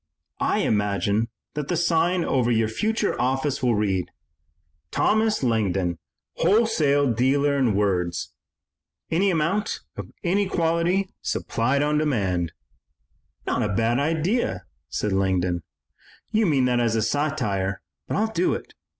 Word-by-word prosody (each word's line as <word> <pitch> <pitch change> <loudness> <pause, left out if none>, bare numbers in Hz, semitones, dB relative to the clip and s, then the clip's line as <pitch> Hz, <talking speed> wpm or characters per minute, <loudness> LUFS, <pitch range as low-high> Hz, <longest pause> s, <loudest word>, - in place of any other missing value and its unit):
I - - +1
imagine 105 +1 +1 0.2
that 150 -2 -4
the 175 - 0
sign 170 +1 +2
over 125 -3 +1
your 115 -2 +2
future 215 - 0
office 135 +2 0
will 120 -3 +2
read, 95 -4 0 0.8
'Thomas 220 -5 +1
Langdon, 95 -7 0 0.4
wholesale 160 - +3
dealer 140 +4 +2
in 125 -7 +2
words. 90 -4 0 0.8
Any 185 +5 +3
amount 180 +5 0
of - - -7
any 195 +3 +1
quality 170 +3 +1
supplied 130 +5 0
on 150 0 +1
demand.'" 95 - 0 0.9
"Not - - 0
a 105 - 0
bad 115 +3 +2
idea," 160 - 0 0.2
said 105 -2 -1
Langdon. 90 -2 +1 0.7
"You 215 -1 +2
mean 135 -5 +3
that 125 -1 +2
as 115 -2 +1
satire, 110 - -1 0.2
but - - -1
I'll 220 +2 0
do 175 +2 +1
it. - - -9
135 Hz, 125 wpm, -24 LUFS, 105-170 Hz, 0.9 s, wholesale